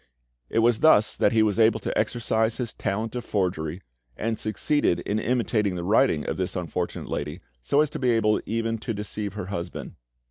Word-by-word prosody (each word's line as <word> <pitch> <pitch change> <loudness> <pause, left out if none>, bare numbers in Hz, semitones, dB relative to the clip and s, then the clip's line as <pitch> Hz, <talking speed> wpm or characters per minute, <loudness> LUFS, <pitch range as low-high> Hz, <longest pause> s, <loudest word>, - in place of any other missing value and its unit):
It 115 - +2
was 120 -2 +3
thus 155 -9 +5
that - - +3
he 110 -1 +4
was 105 0 +1
able 115 0 +4
to - - -3
exercise 110 0 0
his 120 -3 -3
talent 110 +3 -2
of 125 -1 -4
forgery, 90 -5 -2 0.3
and 115 0 -2
succeeded 110 - +1
in 105 +4 -1
imitating 110 -4 0
the 85 - -4
writing 100 - +3
of - - -2
this 95 -1 -2
unfortunate 90 0 -3
lady - - -4 0.2
so 140 - +3
as 155 -1 0
to 155 - -5
be 125 - +1
able 110 -2 +2
even 115 0 -1
to 115 0 -4
deceive 105 0 -4
her 105 -3 -5
husband. 85 0 -5
110 Hz, 190 wpm, -25 LUFS, 95-115 Hz, 0.3 s, thus